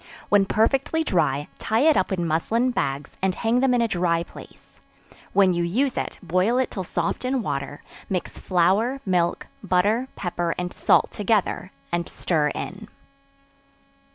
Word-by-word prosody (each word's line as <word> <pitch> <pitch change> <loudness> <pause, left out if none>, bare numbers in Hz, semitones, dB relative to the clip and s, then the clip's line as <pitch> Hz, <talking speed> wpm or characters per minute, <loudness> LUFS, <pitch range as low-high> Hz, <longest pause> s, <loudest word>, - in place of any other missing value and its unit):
When 200 -1 +4
perfectly 270 +10 +1
dry, 145 - 0
tie 220 +2 +1
it 310 +1 +5
up 190 - +1
in 175 -3 -1
muslin 220 +11 +1
bags, 140 - -2
and 190 -1 +1
hang 230 +2 +1
them 265 0 +3
in 240 - +3
a - - +2
dry 175 -4 +1
place; - - -15 0.5
when 195 -2 +4
you 175 0 0
use 245 +10 0
it, - - -3
boil 185 +7 +1
it 260 - 0
till 190 - -4
soft 170 +4 -2
in 255 -1 0
water; 140 -3 -4 0.3
mix 185 -2 -3
flour, 195 +9 +2
milk, 175 -3 +1 0.2
butter, 210 +8 +2
pepper 175 -2 -2
and 180 0 -3
salt - - +3
together, 205 -3 0 0.2
and 170 0 -1
stir 155 -4 0
in. - - -5
185 Hz, 155 wpm, -24 LUFS, 170-230 Hz, 0.5 s, it